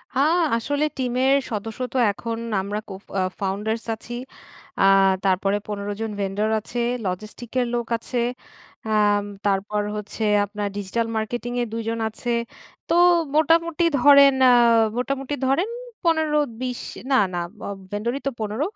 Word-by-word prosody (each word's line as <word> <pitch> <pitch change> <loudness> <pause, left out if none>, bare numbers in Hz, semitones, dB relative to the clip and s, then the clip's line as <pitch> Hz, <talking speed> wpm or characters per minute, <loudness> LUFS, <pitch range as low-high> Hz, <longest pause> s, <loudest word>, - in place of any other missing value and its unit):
হা, 270 - +3 0.4
আসলে 285 +5 0
টিমের 255 +1 +2 0.2
সদস্য 220 +2 -4
তো - - -1
এখন 230 +2 -5 0.2
আমরা 205 +2 -3
কো - - -6 0.3
আ - - +2 0.2
ফাউন্ডার্স 210 +4 -2
আছি। 240 +2 -10 0.7
আ - - +4 0.4
তারপরে 195 +2 +2
১৫ 205 -1 -4
জন 220 -1 -2
ভেন্ডার 200 +3 -1
আছে, 240 +3 -6 0.3
লজিস্টিক 215 +5 -5
এর 245 - 0
লোক 235 -1 -2
আছে। 245 +2 -4 0.7
আম 205 -1 +3 0.2
তারপর 205 +1 0
হচ্ছে 210 +1 -5 0.2
আপনার 205 0 -4
ডিজিটাল 225 +4 -2
মার্কেটিং 240 +2 -3
এর 240 - -1
২ 230 - -2
জন 230 0 -2
আছে। 240 +2 -4 0.6
তো 335 - +3 0.4
মোটামুটি 335 +2 +3
ধরেন, 280 0 +7 0.2
আ - - +7 0.5
মোটামুটি 270 +3 -2
ধরেন 335 +11 +1 0.3
১৫-২০ 300 -7 0 0.3
না, - - +5 0.2
না, 175 - -1 0.3
অব 200 - -5
ভেন্ডরই 235 +6 -2
তো - - +1
১৫ 215 +4 -3
230 Hz, 140 wpm, -23 LUFS, 205-265 Hz, 0.7 s, ধরেন